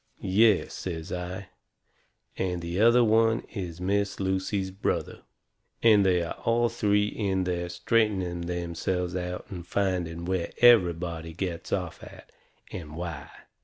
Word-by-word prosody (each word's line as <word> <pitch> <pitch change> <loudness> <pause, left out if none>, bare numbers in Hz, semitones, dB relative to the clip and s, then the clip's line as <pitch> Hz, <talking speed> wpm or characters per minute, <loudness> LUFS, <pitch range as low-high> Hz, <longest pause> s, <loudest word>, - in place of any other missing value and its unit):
"Yes," 100 +1 +3
says 80 -3 -5
I, 90 +2 -5 0.9
"and 90 -2 -2
the 85 +2 -3
other 120 +2 +6
one 115 0 +3
is 90 -5 -5
Miss 100 +2 0
Lucy's 95 0 -1
brother. 95 +2 -2 0.6
And 110 -3 +6
they 90 -2 +3
are 85 - -4
all 120 +1 +2
three 105 -3 +2
in 100 -3 -1
there 90 -1 -2
straightening 95 -2 0
themselves 90 +1 -2
out 90 0 -4
and 90 -3 -6
finding 90 -4 -1
where 90 -2 -2
everybody 85 -8 +4
gets 90 +1 -4
off 90 -4 -2
at, - - -13 0.4
and 75 -4 -7
why. 85 -4 -6
95 Hz, 130 wpm, -27 LUFS, 85-100 Hz, 0.9 s, other